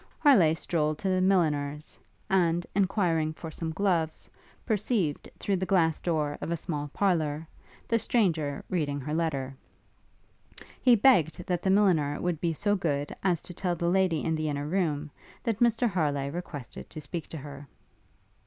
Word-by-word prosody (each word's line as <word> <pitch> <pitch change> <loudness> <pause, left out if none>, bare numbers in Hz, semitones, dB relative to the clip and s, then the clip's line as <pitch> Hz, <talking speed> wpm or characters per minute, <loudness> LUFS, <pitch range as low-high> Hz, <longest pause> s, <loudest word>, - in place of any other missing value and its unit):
Harleigh 195 - +5
strolled 155 -2 -1
to 195 - -2
the 185 0 +2
milliner's, 150 -6 0 0.3
and, 175 -2 +2
enquiring 180 -5 +1
for 160 +1 -8
some 165 +1 -4
gloves, 165 -3 0 0.4
perceived, 210 - 0
through 200 -2 0
the 185 - -3
glass 165 -4 +2
door 155 -4 -1
of - - -4
a 170 - 0
small 150 -3 -4
parlour, 160 -3 0 0.4
the 230 - +2
stranger 165 - 0
reading 145 -5 -1
her 150 +3 -4
letter. 140 -5 -1 1.3
He 250 -2 +6
begged 185 - +3
that 180 -2 -1
the 190 - 0
milliner 180 -8 +3
would 175 -3 -2
be 170 - +1
so 205 +6 +1
good 145 -6 -2
as 180 -4 +1
to 180 - -9
tell 175 0 -1
the 170 +1 0
lady 185 -5 +2
in 160 - 0
the 155 -1 -1
inner 145 0 -2
room, 155 -3 -1 0.3
that 225 -5 -1
Mr 240 0 +3
Harleigh 145 -8 0
requested 150 -5 -7
to - - -8
speak 155 +3 -5
to 160 - -7
her. 140 0 -9
165 Hz, 165 wpm, -28 LUFS, 150-190 Hz, 1.3 s, He